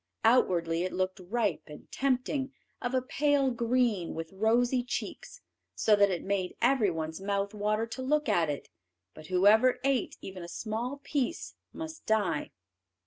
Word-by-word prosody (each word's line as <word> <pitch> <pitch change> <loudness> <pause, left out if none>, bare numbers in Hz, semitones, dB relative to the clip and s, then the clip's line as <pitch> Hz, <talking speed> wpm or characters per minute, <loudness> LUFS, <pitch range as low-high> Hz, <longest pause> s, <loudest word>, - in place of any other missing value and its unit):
Outwardly 175 -8 +3
it 185 - -3
looked 185 0 -1
ripe 200 0 -1
and 150 - -11
tempting, 265 +1 0 0.3
of 245 +1 -2
a 255 - +1
pale 280 0 +2
green 235 -6 0
with 165 +2 -6
rosy 240 +5 +2
cheeks, 245 - -5 0.3
so 215 - +4
that 200 -1 +4
it 180 -3 -2
made 195 -2 -1
everyone's 175 -10 +1
mouth 200 +1 -1
water 215 +1 0
to 230 +3 -7
look 295 +3 +1
at 165 -3 +2
it, 145 - -4 0.5
but 155 0 -12
whoever 205 +7 +5
ate 270 -4 +1
even 190 -1 -8
a 170 - -7
small 235 +8 -4
piece 280 +1 -2 0.2
must 320 -1 -8
die. 200 -9 +1
220 Hz, 150 wpm, -30 LUFS, 185-255 Hz, 0.5 s, whoever